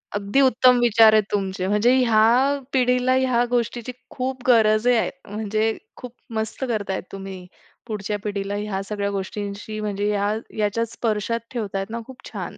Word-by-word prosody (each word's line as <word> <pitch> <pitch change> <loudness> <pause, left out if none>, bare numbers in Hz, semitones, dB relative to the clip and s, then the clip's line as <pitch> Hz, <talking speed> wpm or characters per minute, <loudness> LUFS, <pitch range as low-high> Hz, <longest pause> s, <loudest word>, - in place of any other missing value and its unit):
अगदी 205 +7 +1
उत्तम 255 -1 +5
विचार 225 -2 +6
आहेत 215 -1 +5
तुमचे, 190 -2 -1
म्हणजे 210 +5 +3
ह्या 245 +4 +4
पिढीला 250 0 +2
ह्या 255 -2 +2
गोष्टीची 240 0 -1 0.2
खूप 260 0 -4
गरज 220 -1 +4
आहे, 240 -2 +3 0.2
म्हणजे 215 +1 -1 0.2
खूप 250 -2 -8 0.3
मस्त 220 +4 -3
करताय 205 -5 -2
तुम्ही. 195 -2 -8 0.4
पुढच्या 210 -1 -3
पिढीला 200 -1 -3
ह्या 205 -2 -3
सगळ्या 200 -1 -2
गोष्टींशी, 205 +2 -5
म्हणजे 205 0 -2
ह्या 205 0 0 0.2
ह्याच्यात 215 +2 0
स्पर्शात 225 0 -1
ठेवतायेत 200 -5 -3
ना, 230 +1 -4
खूप 260 -1 -13
छान. - - -6
215 Hz, 150 wpm, -23 LUFS, 205-245 Hz, 0.4 s, विचार